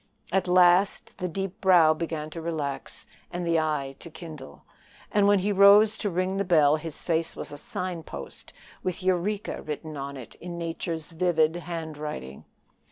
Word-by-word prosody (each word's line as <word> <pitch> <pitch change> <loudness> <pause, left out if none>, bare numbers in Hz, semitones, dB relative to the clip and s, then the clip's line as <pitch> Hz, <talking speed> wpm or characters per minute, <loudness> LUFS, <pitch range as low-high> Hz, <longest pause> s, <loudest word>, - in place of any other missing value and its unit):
At 190 0 +1
last 180 +2 +4
the 180 - -1
deep 195 +3 -5
brow 175 -5 +6
began 155 -1 -4
to 165 - -6
relax, 155 -4 -4 0.3
and 175 0 -3
the 165 -1 +3
eye 150 -4 -1
to 170 - -10
kindle; 155 - -10 0.5
and 205 -1 +4
when 205 0 +5
he 200 +2 0
rose 205 +2 +7
to 205 - -1
ring 185 +2 -1
the 200 - +1
bell 155 -5 +4
his 160 -1 -7
face 165 -1 0
was - - -7
a 145 - -7
sign 180 +1 -4
post 70 - -10 0.3
with 185 0 -3
Eureka 185 +3 -1
written 155 +1 -6
on 140 0 -5
it 120 -4 -10
in 175 0 -6
Nature's 165 -1 -4
vivid 165 -2 +2
handwriting. 155 - -6
170 Hz, 165 wpm, -27 LUFS, 155-185 Hz, 0.5 s, rose